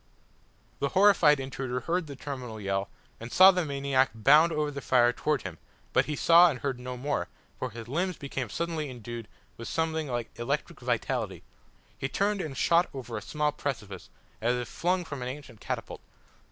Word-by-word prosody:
The 140 - 0
horrified 180 -8 +6
intruder 130 -1 -4
heard 170 +4 -1
the 140 - -7
terminal 130 -5 -6
yell, 100 -1 -2 0.3
and 115 +1 -8
saw 190 +1 +9
the 180 -1 0
maniac 140 -2 +1
bound 150 +9 +6
over 150 -1 -1
the 140 0 -6
fire 120 -2 +4
towards 150 +2 -1
him, 85 -4 -7 0.3
but - - +4
he 150 - -3
saw 170 +4 +7
and 130 -6 -4
heard 135 -3 -2
no 125 0 -6
more, 125 -9 -2 0.3
for 130 - -2
his 115 0 -9
limbs 175 +6 -1
became 135 -4 -4
suddenly 165 -1 -3
endued 120 -2 -7 0.3
with 115 - -7
something 160 -1 -1
like 120 -3 -3
electric 120 - -2
vitality. - - -2 0.5
He 135 - -3
turned 200 +3 0
and 140 -6 -5
shot 170 +1 +3
over 120 -3 -6
a 105 - -3
small 150 +6 -1
precipice, 105 -11 -5 0.3
as 120 +2 +2
if 125 -1 -3
flung 180 +7 0
from 140 -5 -6
an 125 - -3
ancient 130 -4 -8
catapult. - - -5
135 Hz, 180 wpm, -28 LUFS, 120-160 Hz, 0.5 s, saw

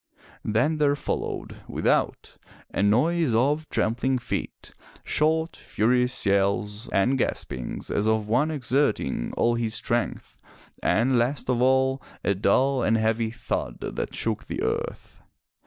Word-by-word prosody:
Then 120 +9 +1
there 145 -1 +3
followed, 145 - -4
without, - - 0 0.4
a - - 0
noise 125 +6 +3
of 145 +6 +1
trampling 125 +4 +1
feet, 120 - -5 0.3
short, 160 +2 +1
furious 125 +3 +1
yells, 100 +3 +1
and 125 +8 +2
gaspings 65 - -3
as 105 - +1
of 110 -1 +1
one 125 +8 +2
exerting 130 - 0
all 120 - +3
his 115 -1 -1
strength, 120 +1 -2 0.4
and, 125 +2 +2
last 125 +2 0
of 120 -1 0
all, 130 +1 +3 0.2
a 100 - +2
dull 130 +7 +2
and 115 -1 +3
heavy 110 +1 +1
thud 85 - -4
that - - -4
shook - - -2
the - - -3
earth. - - -4
120 Hz, 130 wpm, -25 LUFS, 110-135 Hz, 0.4 s, there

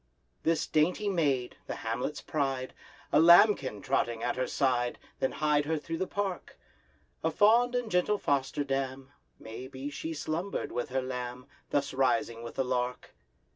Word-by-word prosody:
This 160 -1 +1
dainty 175 +7 +1
maid, 140 -9 0
the - - -3
hamlet's - - -2
pride, 135 -4 -2 0.4
A - - +6
lambkin 165 - +6
trotting 120 -4 0
at 120 - 0
her 130 0 -1
side, 125 -3 +1 0.2
Then 130 - +1
hied 150 -1 +2
her 160 +1 0
through 165 +2 -5
the 185 - -1
park; 195 -3 -4 0.7
A 160 - +3
fond 230 +8 +4
and 245 -3 -1
gentle 180 +4 +2
foster 140 -3 0
dam— 135 0 -3 0.3
May 115 +3 -8
be 135 +2 -6
she 160 +3 -5
slumbered 165 +6 -3
with 120 +1 -3
her 130 0 -1
lamb, 125 -1 -5 0.2
Thus 140 -1 0
rising 115 -3 +1
with 115 0 -8
the 135 - 0
lark! 125 0 -2
135 Hz, 160 wpm, -30 LUFS, 125-165 Hz, 0.7 s, A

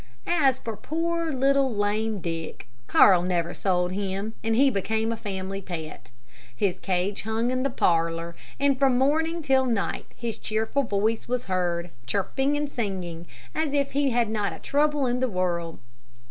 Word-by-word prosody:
As 280 -7 +3
for 225 -4 -5
poor, 330 +7 -1
little, 275 0 +3
lame 205 0 0
Dick, 165 -7 -5 0.2
Carl 185 -3 +6
never 175 -1 0
sold 180 -2 0
him, 200 +2 -3
and 225 0 +1
he 270 +3 +5
became 220 +2 0
a - - -1
family 195 -2 -4
pet. 165 -4 -7 0.5
His 185 +5 0
cage 190 +1 -1
hung 225 +3 -1
in 255 0 0
the 275 - +1
parlor, 165 -5 +1 0.2
and 280 -2 +2
from 265 -3 +4
morning 320 +5 +1
till 265 -2 +3
night 225 -5 -1
his 235 -2 -4
cheerful 220 +6 0
voice 220 -2 0
was 250 0 -1
heard, 175 -2 -1 0.2
chirping 270 - 0
and 295 0 -1
singing 185 - -4 0.3
as 310 -2 -1
if 280 -1 +1
he 280 0 +2
had 240 -2 +2
not 210 -4 -1
a - - -8
trouble 295 -1 +1
in 245 0 0
the 260 0 +1
world. 175 -4 -1
220 Hz, 165 wpm, -26 LUFS, 185-270 Hz, 0.5 s, Carl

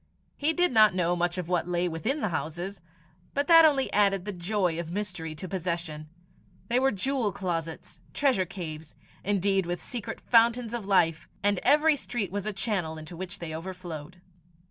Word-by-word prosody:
He 295 +3 +1
did 355 +2 +2
not 215 -5 +6
know 175 -1 +1
much 175 +1 -1
of 180 -2 -3
what 175 -1 0
lay 175 0 0
within 220 - -2
the 215 - 0
houses; 175 +5 -4 0.5
but 285 +1 +1
that 330 -1 +9
only 275 -4 +2
added 195 -2 +3
the 205 - -2
joy 180 -2 -1
of 170 -1 -5
mystery 175 -4 -4
to 170 +5 -7
possession: 170 -4 -4 0.6
they 240 +2 +3
were 265 +1 +3
jewel 245 0 0
closets, 165 -2 -4
treasure 255 -11 +1
caves, 160 -4 -7 0.3
indeed, 195 -2 +1
with 175 0 -3
secret 240 -4 -5
fountains 235 0 +3
of 230 -5 -4
life; 165 -5 +2
and 205 -2 +3
every 300 +4 +4
street 240 -7 -3
was 205 +1 -3
a - - 0
channel 190 -6 -1
into 155 +3 -9
which 185 +1 -6
they 160 -2 -6
overflowed. 175 -1 -7
185 Hz, 175 wpm, -28 LUFS, 170-220 Hz, 0.6 s, that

